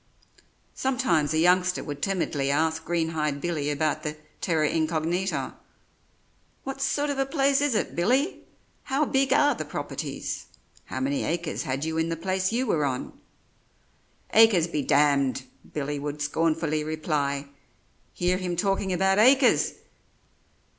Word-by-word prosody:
Sometimes 235 Hz, -, +1 dB
a 155 Hz, -, +1 dB
youngster 180 Hz, +2 st, +3 dB
would 145 Hz, -2 st, -6 dB
timidly 160 Hz, -8 st, -1 dB
ask 160 Hz, +3 st, +1 dB
Greenhide 160 Hz, -4 st, -1 dB
Billy 155 Hz, -3 st, -2 dB
about 155 Hz, +1 st, 0 dB
the 150 Hz, -1 st, -4 dB, 0.2 s
'terra 160 Hz, -3 st, +1 dB
incognita': 165 Hz, +4 st, -1 dB, 1.1 s
"What 270 Hz, 0 st, -5 dB
sort 290 Hz, +1 st, 0 dB
of 275 Hz, -, -3 dB
a 270 Hz, -, +2 dB
place 275 Hz, -1 st, +2 dB
is 290 Hz, -5 st, +1 dB
it, -, -, -1 dB
Billy 255 Hz, -, +1 dB, 0.5 s
how 275 Hz, +2 st, +1 dB
big 270 Hz, 0 st, +1 dB
are 290 Hz, 0 st, +4 dB
the -, -, -5 dB
properties? -, -, -5 dB, 0.4 s
How -, -, -5 dB
many 275 Hz, +1 st, 0 dB
acres 170 Hz, -1 st, -2 dB
had 135 Hz, +3 st, -2 dB
you 160 Hz, 0 st, -2 dB
in 160 Hz, +1 st, 0 dB
the 165 Hz, -, -2 dB
place 190 Hz, +3 st, -1 dB
you 245 Hz, +3 st, 0 dB
were 160 Hz, -, +1 dB
on?" 130 Hz, -3 st, -2 dB, 1.2 s
"Acres 220 Hz, -7 st, +6 dB
be 160 Hz, -3 st, -2 dB
d -, -, -8 dB, 0.5 s
d!" 135 Hz, -, -7 dB, 0.3 s
Billy 145 Hz, -1 st, -3 dB
would 145 Hz, +1 st, -5 dB
scornfully 155 Hz, +1 st, 0 dB
reply; 145 Hz, -3 st, -2 dB, 0.6 s
"hear 180 Hz, +1 st, 0 dB
him 180 Hz, -2 st, -3 dB
talking 195 Hz, 0 st, 0 dB
about 190 Hz, +2 st, +2 dB
acres! 260 Hz, +3 st, +5 dB
170 Hz, 140 wpm, -26 LUFS, 150-220 Hz, 1.2 s, Acres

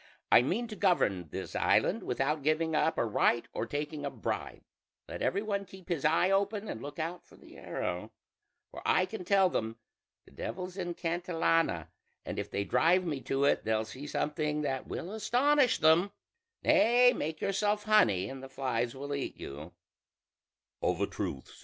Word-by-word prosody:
I -, -, +8 dB
mean 205 Hz, -, -1 dB
to 215 Hz, -, -6 dB
govern 105 Hz, -, +1 dB
this -, -, -6 dB
island -, -, +2 dB
without 150 Hz, +3 st, -1 dB
giving 155 Hz, +2 st, +1 dB
up 160 Hz, +1 st, +2 dB
a -, -, +2 dB
right 115 Hz, +2 st, +2 dB
or 115 Hz, -, -3 dB
taking 145 Hz, +2 st, -4 dB
a 140 Hz, -, -1 dB
bribe: -, -, -4 dB, 0.4 s
let -, -, -7 dB
every 200 Hz, +3 st, 0 dB
one 200 Hz, -2 st, -1 dB
keep 190 Hz, -2 st, -14 dB
his 165 Hz, -6 st, -1 dB
eye 165 Hz, +5 st, +3 dB
open 200 Hz, +2 st, 0 dB
and 110 Hz, -, -5 dB
look 145 Hz, +1 st, -8 dB
out 165 Hz, +2 st, -4 dB
for -, -, -19 dB
the -, -, -16 dB
arrow; -, -, -4 dB, 0.6 s
for -, -, -9 dB
I -, -, +3 dB
can 220 Hz, -5 st, -7 dB
tell 195 Hz, +1 st, +4 dB
them 115 Hz, -9 st, -2 dB, 0.5 s
'the -, -, -19 dB
Devil's 185 Hz, -1 st, -6 dB
in 175 Hz, -3 st, -4 dB
Cantillana,' 165 Hz, -, 0 dB, 0.4 s
and -, -, -4 dB
if -, -, -4 dB
they 100 Hz, -, -1 dB
drive 175 Hz, -, +3 dB
me 145 Hz, -5 st, -2 dB
to 135 Hz, +1 st, -1 dB
it 140 Hz, -, +3 dB
they'll 110 Hz, 0 st, 0 dB
see 130 Hz, +6 st, -8 dB
something 150 Hz, 0 st, -1 dB
that 135 Hz, -2 st, -2 dB
will 180 Hz, -, -5 dB
astonish 255 Hz, +5 st, +3 dB
them. 160 Hz, +5 st, +4 dB, 0.5 s
Nay! 250 Hz, -5 st, +5 dB
make 155 Hz, 0 st, -3 dB
yourself 205 Hz, +1 st, 0 dB
honey 105 Hz, -, +4 dB
and 135 Hz, +4 st, -7 dB
the 135 Hz, -, -9 dB
flies 120 Hz, -3 st, -2 dB
will 140 Hz, +2 st, -5 dB
eat 140 Hz, -, -4 dB
you." 75 Hz, +5 st, -8 dB
160 Hz, 170 wpm, -31 LUFS, 135-195 Hz, 0.6 s, I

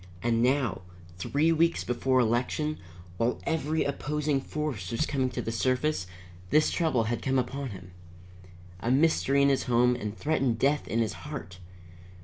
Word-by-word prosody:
And 115 Hz, -1 st, +2 dB
now, 125 Hz, -4 st, +1 dB, 0.4 s
three 150 Hz, -, +2 dB
weeks 165 Hz, +1 st, +2 dB
before 130 Hz, +1 st, +1 dB
election, 125 Hz, +6 st, 0 dB, 0.4 s
while 115 Hz, +4 st, 0 dB
every 160 Hz, -1 st, 0 dB
opposing 145 Hz, 0 st, -1 dB
force 135 Hz, -12 st, -4 dB
was 115 Hz, +8 st, 0 dB
coming 130 Hz, -4 st, 0 dB
to 125 Hz, -, -4 dB
the 115 Hz, -, -3 dB
surface, 130 Hz, -2 st, 0 dB, 0.4 s
this 155 Hz, +1 st, +4 dB
trouble 155 Hz, -9 st, +1 dB
had 115 Hz, +2 st, -2 dB
come 135 Hz, 0 st, +1 dB
upon 135 Hz, +2 st, -2 dB
him. 95 Hz, -3 st, -10 dB, 0.9 s
A 115 Hz, -, -2 dB
mystery 140 Hz, 0 st, +3 dB
in 140 Hz, -, +5 dB
his 135 Hz, -, +1 dB
home 125 Hz, 0 st, +3 dB
and 105 Hz, -1 st, -5 dB
threatened 135 Hz, -6 st, 0 dB
death 140 Hz, +4 st, +1 dB
in 115 Hz, -, -2 dB
his 110 Hz, -3 st, -1 dB, 0.2 s
heart! 90 Hz, +3 st, -7 dB
130 Hz, 155 wpm, -28 LUFS, 115-150 Hz, 0.9 s, in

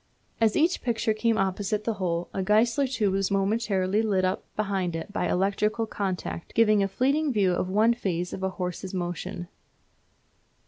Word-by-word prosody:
As 220 Hz, -2 st, +3 dB
each 330 Hz, +4 st, +2 dB
picture 230 Hz, -2 st, 0 dB
came 225 Hz, +1 st, +1 dB
opposite 195 Hz, +2 st, -1 dB
the 230 Hz, -, 0 dB
hole 170 Hz, -1 st, -1 dB
a 195 Hz, -, -1 dB
Geissler 230 Hz, +7 st, +3 dB
tube 220 Hz, -7 st, 0 dB
was 195 Hz, 0 st, 0 dB
momentarily 195 Hz, 0 st, +1 dB
lit 195 Hz, -4 st, +1 dB
up 185 Hz, +1 st, -1 dB
behind 195 Hz, -5 st, -1 dB
it 165 Hz, +5 st, -6 dB
by -, -, 0 dB
electrical 210 Hz, +4 st, +1 dB
contact, 190 Hz, -5 st, -4 dB
giving 215 Hz, -2 st, +4 dB
a 195 Hz, -, +2 dB
fleeting 275 Hz, +9 st, +1 dB
view 200 Hz, -6 st, +2 dB
of 180 Hz, +1 st, -1 dB
one 215 Hz, +4 st, +4 dB
phase 180 Hz, -6 st, -3 dB
of -, -, -5 dB
a 190 Hz, -, 0 dB
horse's 185 Hz, 0 st, -5 dB
motion. 175 Hz, 0 st, -4 dB
200 Hz, 170 wpm, -26 LUFS, 185-225 Hz, -, giving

